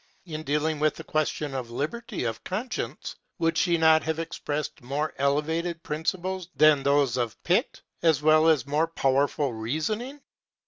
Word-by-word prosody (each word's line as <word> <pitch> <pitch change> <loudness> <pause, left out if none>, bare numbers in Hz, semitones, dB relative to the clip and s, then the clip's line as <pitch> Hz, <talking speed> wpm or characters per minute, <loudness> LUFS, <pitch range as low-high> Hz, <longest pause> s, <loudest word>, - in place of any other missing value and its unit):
In 155 -3 -5
dealing 150 +1 0
with 155 0 +2
the - - -8
question 155 -2 -1
of 130 -3 -4
liberty 155 - -4
of 115 -2 -3
conscience, 215 +7 -4 0.2
would 165 0 +1
she 170 0 +2
not 160 -1 +5
have 160 0 -2
expressed 155 -3 -4
more 140 +5 -2
elevated 160 +4 0
principles 180 +3 -3
than 155 -2 +5
those 140 -3 +2
of 120 -3 -2
Pitt, - - 0 0.2
as 160 -4 +4
well 155 +1 +5
as 155 -6 +3
more 150 +3 +1
powerful 140 -2 +1
reasoning? 160 - -3
155 Hz, 150 wpm, -26 LUFS, 140-165 Hz, 0.2 s, not